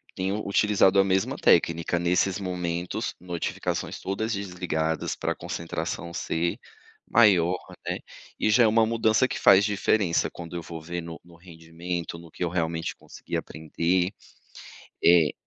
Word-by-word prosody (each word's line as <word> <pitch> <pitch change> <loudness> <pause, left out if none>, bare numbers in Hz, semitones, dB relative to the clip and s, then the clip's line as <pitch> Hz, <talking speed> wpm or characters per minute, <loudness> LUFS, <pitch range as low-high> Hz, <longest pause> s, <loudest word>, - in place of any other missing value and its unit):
tenho 95 +3 -2
utilizado 100 -1 +4
a - - +6
mesma 95 0 0
técnica 85 +1 +3
nesses 90 +3 +1
momentos, 90 -2 -3
notificações 90 -1 -3
todas 110 +4 -2
desligadas 90 -5 -2
pra - - -2
concentração 85 0 -5
ser 85 0 -1 0.5
maior, 95 -6 +5 0.3
né. - - -2 0.4
E 110 - +2
já 120 +3 +5
é 115 - +6
uma 110 +1 +4
mudança 115 +2 +2
que - - -4
faz 100 0 +7
diferença 100 -3 +1
quando 85 0 -9
eu 85 - -3
vou 80 -1 -8
ver 85 +2 -5
no 85 0 -8
no 85 -1 -17
rendimento, 85 0 -6
no 85 -1 -13
que - - -5
eu 85 - 0
realmente 80 -1 -2
consegui - - -8
aprender. 85 +3 -1 0.9
Eh. 85 -3 +5
90 Hz, 145 wpm, -26 LUFS, 85-100 Hz, 0.9 s, faz